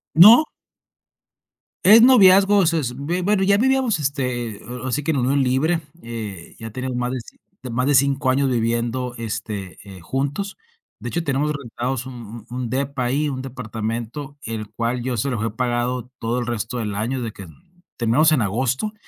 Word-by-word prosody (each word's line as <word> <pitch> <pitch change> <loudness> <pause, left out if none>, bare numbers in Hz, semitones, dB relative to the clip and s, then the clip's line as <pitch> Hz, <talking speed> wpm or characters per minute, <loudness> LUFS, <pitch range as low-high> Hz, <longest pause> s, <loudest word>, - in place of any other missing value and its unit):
No. 215 - +9 1.4
Es 210 +5 +8
noviazgo. 200 -5 +7
Es 170 0 +2
es, 140 -7 -1
b 175 +4 -1
bueno, 195 +1 +2
ya 200 +1 +4
vivíamos, 255 -4 +2
este, 125 -6 -2 0.3
así 130 +3 -1
que 150 - -1
en 150 - 0
unión 135 +2 +2
libre, 140 +7 +1 0.2
eh, 110 -7 -7
ya 115 -1 -7
teníamos 130 +2 -4
más 125 0 -1
de 130 +1 -10
más 125 +3 0
de 145 - +3
5 140 0 +2
años 135 +1 +2
viviendo, 120 +1 -1
este, 105 -4 -5
eh, 95 -3 -12
juntos. 140 - -3 0.4
De - - -7
hecho, 170 - -2
tenemos 145 +1 0
rentados 130 -2 -4
un 120 -3 -9
un 125 -1 -4
depa 135 0 -2
ahí, 145 +5 0
un 130 -2 -4
departamento, 120 +2 -5
el 110 -5 -5
cual 115 +3 -2
yo 125 0 -2
se 120 +5 -1
lo 125 - -2
dejé 110 +1 -2
pagado 125 +1 -2
todo 115 +2 -1
el 120 - -4
resto 120 +1 -3
del 105 -3 -3
año, 120 +5 -2
de 115 -2 -4
que 100 -3 -11 0.5
terminamos 130 +7 +3
en 140 - +2
agosto 130 - -1
125 Hz, 175 wpm, -22 LUFS, 115-145 Hz, 1.4 s, No